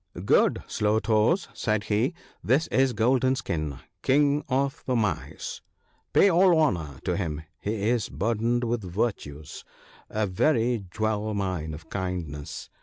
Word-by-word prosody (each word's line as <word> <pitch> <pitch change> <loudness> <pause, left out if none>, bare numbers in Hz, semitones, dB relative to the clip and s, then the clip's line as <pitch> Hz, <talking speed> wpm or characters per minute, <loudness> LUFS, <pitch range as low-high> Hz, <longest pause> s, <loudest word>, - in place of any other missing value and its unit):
' - - -6
Good - - +2
Slow 105 +1 +1
toes,' 110 - +2
said 110 -1 0
he, 115 +10 0
' - - -32
this 145 +5 +4
is 130 -1 +3
Golden 130 +4 +2
skin, 75 - -3 0.2
King 145 +2 +3
of 140 +3 0
the 130 - +1
Mice, 110 -3 -2 0.3
— - - -41
pay - - +6
all 180 -1 +5
honour 80 - 0
to 90 - 0
him,— 80 -5 -3 0.2
he 105 0 -2
is 120 -5 0
burdened 115 - 0
with 120 -1 -1
virtues 90 -7 -4 0.2
— - - -24
a 110 0 0
very 115 +2 +1
jewel 110 +2 -1
mine 90 -6 -2
of 80 +1 -14
kindnesses. 90 -7 -5
110 Hz, 155 wpm, -26 LUFS, 90-130 Hz, 0.3 s, pay